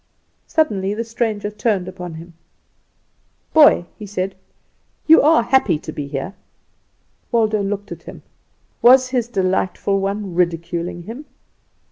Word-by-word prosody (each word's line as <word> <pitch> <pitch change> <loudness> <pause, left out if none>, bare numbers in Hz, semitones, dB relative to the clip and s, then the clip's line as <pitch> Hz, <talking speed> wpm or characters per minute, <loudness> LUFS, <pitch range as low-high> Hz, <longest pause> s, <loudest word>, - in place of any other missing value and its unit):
Suddenly 205 -11 0
the 230 - -2
stranger 220 -3 -2
turned 210 -3 -1
upon 180 -2 -7
him. 170 +2 -11 1.2
"Boy," 295 - +6
he 210 - -7
said, 190 -1 -3 0.7
"you 320 +1 +7
are 305 -4 +4
happy 245 - +2
to 155 - -8
be 145 -2 -5
here." 140 +7 -5 1.0
Waldo 220 -3 +2
looked 200 +1 -4
at - - -7
him. - - -11 0.6
Was 255 +1 +6
his 250 -3 -1
delightful 190 -1 0
one 195 -1 -3
ridiculing 170 0 -2
him? 235 - -9
200 Hz, 125 wpm, -20 LUFS, 180-235 Hz, 1.2 s, you